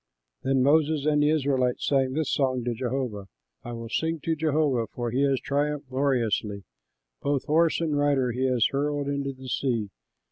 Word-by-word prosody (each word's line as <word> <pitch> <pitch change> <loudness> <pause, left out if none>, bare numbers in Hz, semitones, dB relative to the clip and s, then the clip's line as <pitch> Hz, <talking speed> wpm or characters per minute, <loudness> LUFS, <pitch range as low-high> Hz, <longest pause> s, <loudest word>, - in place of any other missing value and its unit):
Then 135 -1 +2
Moses 150 +1 +3
and 150 -1 +3
the 150 - +4
Israelites 135 -5 +1
sang 135 -2 +2
this 155 +1 -1
song 130 -3 +1
to 120 0 -1
Jehovah: 120 -4 -3 0.4
"I 120 - -6
will 115 0 -6
sing 160 +7 -1
to 165 - 0
Jehovah, 150 -6 +1
for 120 -1 -3
he 130 +4 0
has 135 -2 +1
triumphed 145 -1 -2
gloriously: 115 -7 0 0.6
Both 140 -1 0
horse 160 +2 +3
and 160 -3 0
rider 140 -3 +2
he 130 +3 0
has 125 -3 +2
hurled 145 0 -1
into 140 -1 -2
the 130 0 -11
sea. 120 -6 -1
135 Hz, 175 wpm, -26 LUFS, 125-145 Hz, 0.6 s, the